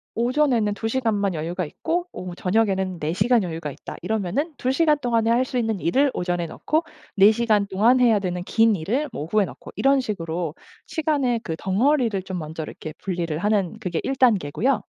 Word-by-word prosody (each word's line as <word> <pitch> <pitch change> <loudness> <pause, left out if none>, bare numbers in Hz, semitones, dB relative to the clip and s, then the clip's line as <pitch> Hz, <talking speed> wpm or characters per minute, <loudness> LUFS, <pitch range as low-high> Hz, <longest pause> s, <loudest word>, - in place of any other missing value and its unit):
'오전에는 240 -3 +2
2 225 - -3
시간만 220 -6 0
여유가 165 +3 -3
있고 345 - -2
오후, 180 -1 -7
저녁에는 190 -3 0
4 155 +2 -1
시간 240 +4 +3
여유가 165 -4 -4
있다.' - - -9
이러면은 220 - -1
2 255 - 0
시간 305 0 +3
동안에 230 -3 +1
할 250 +2 +3
수 255 - -4
있는 225 -4 0
일을 270 - +2
오전에 175 -1 -1
넣고 310 - -1 0.3
4 200 +2 +7
시간 215 -3 +2
동안 225 +7 +3
해야 225 -4 +5
되는 180 -2 -3
긴 225 +1 +3
일을 245 - -1
뭐 145 - -4
오후에 200 +5 +2
넣고 - - -11
이런 275 0 +3
식으로 170 -7 -3 0.3
시간의 285 -7 0
그 160 - -3
덩어리를 225 - +1
좀 190 -1 -5
먼저 160 +1 -6
이렇게 155 0 -8
분리를 170 -5 -3
하는 205 -1 0
그게 180 -5 -2
1 270 - -1
단계고요. 230 - +2
210 Hz, 370 characters per minute, -23 LUFS, 180-250 Hz, 0.3 s, 4